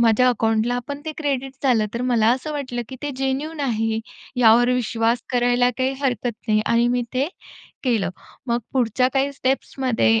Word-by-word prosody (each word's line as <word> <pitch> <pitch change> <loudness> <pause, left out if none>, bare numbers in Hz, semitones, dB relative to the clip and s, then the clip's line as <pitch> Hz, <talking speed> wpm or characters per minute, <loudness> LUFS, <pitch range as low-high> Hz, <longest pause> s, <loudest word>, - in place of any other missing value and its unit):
माझ्या 235 +2 +4
अकाउंटला 230 +1 +1
पण 285 0 -5
ते 315 - -3
क्रेडिट 270 -3 -2
झालं. 230 -5 +3
तर 235 - -2
मला 240 -3 +2
असं 265 +5 -3
वाटलं, 255 -5 -3
की 260 - -8
ते 290 - -2
जेन्यूइन 270 +4 -2
आहे 225 -4 0 0.4
यावर 235 +1 +6
विश्वास 230 -1 0
करायला 245 0 +3
काही 260 +1 +1
हरकत 245 -3 0 0.2
नाही 215 0 +4
आणि 235 +1 +3
मी 245 0 +1
ते 265 +3 +2 0.6
केलं. 220 -8 +1 0.4
मग 235 -1 +1
पुढच्या 255 0 +2
काही 275 +1 +1
स्टेप्समध्ये 255 - +1
245 Hz, 165 wpm, -22 LUFS, 230-265 Hz, 0.6 s, यावर